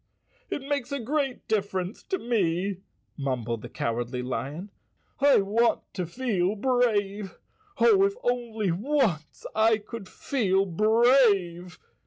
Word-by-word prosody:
"It 280 - -3
makes 280 -2 -2
a 280 - -2
great 270 +1 -2
difference 195 -2 -2
to 380 - -1
me," 195 - 0 0.4
mumbled 120 -5 -2
the - - -8
Cowardly 120 +2 -3
Lion. 145 +9 -4 0.5
"I 280 -5 +5
want 220 +4 +2
to 180 -3 -3
feel 205 -2 -1
brave. 210 -4 0 0.4
Oh, 405 -4 +5
if 400 0 -1
only 230 -5 -1
once 205 - -1
I 220 0 +4
could 215 -1 -9
feel 195 -8 0
brave!" 205 -3 +3
210 Hz, 120 wpm, -27 LUFS, 180-245 Hz, 0.5 s, I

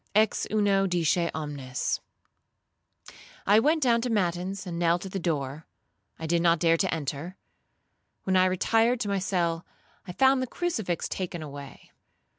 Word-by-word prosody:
Ex 215 0 +2
uno 200 -2 +2
disce 175 -1 +1
omnes. 140 -5 -3 1.5
I 205 +2 +6
went 305 +5 +2
down 235 -2 +3
to 250 - -2
matins, 190 -2 -1
and 170 -2 -4
knelt 175 +2 +1
at 190 - -7
the 195 - -3
door; 150 -3 -3 0.5
I 160 - -6
did 170 +1 +1
not 170 0 +4
dare 165 +1 +3
to 190 +2 0
enter. 155 +3 -4 0.9
When 190 - 0
I 185 0 +5
retired 225 +6 +2
to 210 - -1
my 200 -1 0
cell, 175 -3 -1 0.4
I - - -5
found 265 +6 +4
the 255 - -2
crucifix 225 - -2
taken 175 -3 -4
away. 140 -2 -10
180 Hz, 155 wpm, -27 LUFS, 165-205 Hz, 1.5 s, I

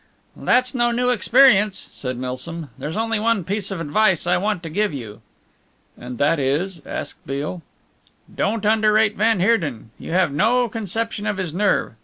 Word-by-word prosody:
"That's 250 +1 +1
no 240 -2 +2
new 245 +1 +1
experience," 225 -3 +4
said 125 -2 -5
Milsom, 130 +4 -5
"there's 155 +5 -5
only 225 -1 0
one 225 -3 +1
piece 200 +3 -3
of 195 -4 -4
advice 170 +3 +1
I 175 - +2
want 205 -2 -1
to 165 - -5
give 205 -1 0
you." 110 -6 -8 0.7
"And 125 0 -8
that 150 +4 +2
is?" 155 +6 -1
asked - - -6
Beale. 145 +6 -4 0.7
"Don't 215 +1 -1
underrate 215 0 +3
van 220 -2 +2
Heerden. 160 - 0
You - - -6
have 185 -5 +2
no 240 - +2
conception 220 0 -3
of 210 -1 -1
his 180 -5 -3
nerve. 200 - +1
195 Hz, 165 wpm, -21 LUFS, 155-220 Hz, 0.7 s, experience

